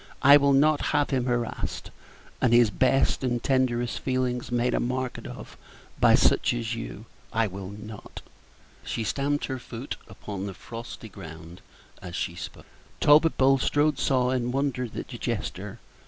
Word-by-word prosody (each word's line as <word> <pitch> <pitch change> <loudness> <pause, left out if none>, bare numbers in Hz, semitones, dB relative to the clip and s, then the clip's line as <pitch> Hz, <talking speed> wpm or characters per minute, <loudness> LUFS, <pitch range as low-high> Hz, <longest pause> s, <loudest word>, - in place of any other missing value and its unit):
I 140 +1 +9
will 140 -1 +5
not 150 +2 +4 0.2
have 145 0 +1
him 130 -2 +1
harassed, 120 -2 -2 0.5
and 125 -3 +3
his 120 -3 +6
best 130 +5 +2
and 120 -2 +1
tenderest 125 -3 +1
feelings 125 -2 -1
made 120 +1 +1
a - - +1
market 130 +1 -3
of - - -9 0.4
by - - +6
such - - +3
as 115 -1 -2
you. 115 -1 -6 0.3
I 115 0 +2
will 95 -1 -6
not!" 105 +1 -10 0.6
She 115 - -3
stamped 140 +6 -1
her 130 -1 -4
foot 120 +2 -7
upon 100 -1 -6
the 95 - -6
frosty 115 +1 -8
ground 85 -3 -11 0.4
as 90 -2 -7
she 85 - -2
spoke. 85 - -9 0.3
Talbot 155 +2 +5
Bulstrode 135 +2 +3
saw 125 -2 +2
and 125 -1 0
wondered 130 -3 -2
at - - -5
the - - -8
gesture. 100 +3 -4
125 Hz, 155 wpm, -26 LUFS, 110-135 Hz, 0.6 s, I